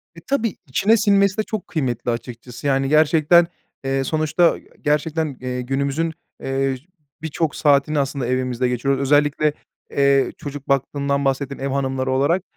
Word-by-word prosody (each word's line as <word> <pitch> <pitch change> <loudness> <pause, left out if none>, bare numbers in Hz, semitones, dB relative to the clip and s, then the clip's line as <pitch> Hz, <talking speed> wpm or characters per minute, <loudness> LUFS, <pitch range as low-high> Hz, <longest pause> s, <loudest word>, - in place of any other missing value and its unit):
E, - - -10
tabii 230 -6 0
içine 205 - +3
sinmesi 200 -1 +3
de 215 - +1
çok 215 -2 -5
kıymetli, 125 -6 -2
açıkçası, 120 +2 -6
yani, 135 -1 +1
gerçekten, 155 +3 +5 0.4
eee, 135 0 0
sonuçta 155 +4 +2 0.2
gerçekten, 150 -1 0
eee, 125 0 -3
günümüzün, 140 +5 -1 0.3
eee, 135 0 0 0.5
birçok 160 -1 -2
saatini 145 0 +3
aslında 135 -2 -2
evimizde 125 0 0
geçiriyoruz. 135 +2 0
Özellikle, 145 +2 +2 0.4
eee, 140 -1 +3
çocuk 145 -1 -8
baktığından 140 +1 0
bahsettin 135 0 -1
ev 135 - -2
hanımları 130 -1 -1
olarak. 145 +8 +2
140 Hz, 140 wpm, -21 LUFS, 135-155 Hz, 0.5 s, gerçekten